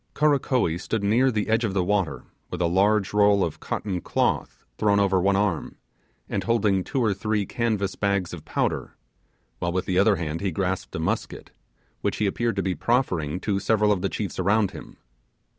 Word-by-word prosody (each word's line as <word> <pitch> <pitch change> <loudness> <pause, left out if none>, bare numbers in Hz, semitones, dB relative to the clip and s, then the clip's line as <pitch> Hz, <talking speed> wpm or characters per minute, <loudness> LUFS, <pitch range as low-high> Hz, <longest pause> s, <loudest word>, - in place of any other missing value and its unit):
Karakoee 130 - +2
stood 110 -3 -2
near 115 +6 +3
the 105 -4 -1
edge 110 +2 +2
of 100 -4 -1
the 95 - +2
water 95 -5 0 0.3
with - - -5
a 90 - +2
large 100 +4 +2
roll 100 -1 +4
of 80 - -3
cotton 95 -4 -3
cloth - - -1
thrown 100 -1 +3
over 95 -2 +2
one 100 +2 +3
arm, 100 -5 -1 0.5
and - - -2
holding 105 -5 +2
two 130 +5 -1
or 110 -3 +2
three 105 +1 -1
canvas 105 -3 -1
bags 100 -4 -1
of 80 -4 -8
powder, - - -2 0.6
while 85 - -1
with 90 +1 -1
the 95 0 +1
other 100 +1 +4
hand 80 -2 -4
he 100 - 0
grasped 95 +2 -2
a - - -2
musket, - - -3 0.5
which - - -1
he 105 - +1
appeared 115 +3 0
to 100 - -1
be 95 - 0
proffering 90 - 0
to 100 -1 0
several 105 0 +2
of 100 -3 +1
the 100 - 0
chiefs 100 -3 -4
around 100 +2 +2
him. - - -11
100 Hz, 190 wpm, -25 LUFS, 95-110 Hz, 0.6 s, roll